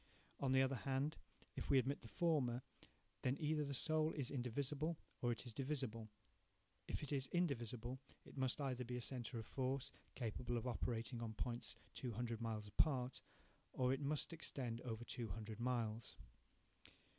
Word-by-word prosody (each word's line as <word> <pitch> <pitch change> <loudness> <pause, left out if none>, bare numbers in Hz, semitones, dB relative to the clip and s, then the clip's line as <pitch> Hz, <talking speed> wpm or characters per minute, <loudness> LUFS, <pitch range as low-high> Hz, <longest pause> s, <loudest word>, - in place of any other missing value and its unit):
On 135 -2 +2
the 130 0 +7
other 135 0 +2
hand, 135 +5 +1 0.4
if - - -3
we 140 - +7
admit 135 +2 +3
the 115 - -8
former, 130 -5 +2 0.6
then 130 +2 +2
either 155 -1 +2
the 140 -1 -1
soul 155 +3 +4
is 140 -5 -1
indivisible, 140 +5 +1 0.2
or 120 - +3
it 120 - -2
is 120 - -3
divisible. 130 -5 -1 0.8
If - - -1
indivisible, 130 -4 0 0.3
it - - -12
must 130 +1 +2
either 130 -3 0
be 125 +1 -2
a - - -2
centre 120 -1 -2
of 110 - -3
force, 130 +2 0 0.2
capable 120 0 -1
of 115 - -2
operating 120 -1 0
on 110 -1 -2
points 120 +1 -1 0.2
two 125 -3 -2
hundred 115 0 -1
miles 110 -2 -1
apart, 125 +3 +3 0.5
or 130 0 +4
it 135 - -1
must 150 +3 +1
extend 125 -7 -2
over 115 -2 -3
two 120 -2 -2
hundred 110 +3 -4
miles. 115 -2 0
125 Hz, 160 wpm, -43 LUFS, 115-140 Hz, 0.8 s, the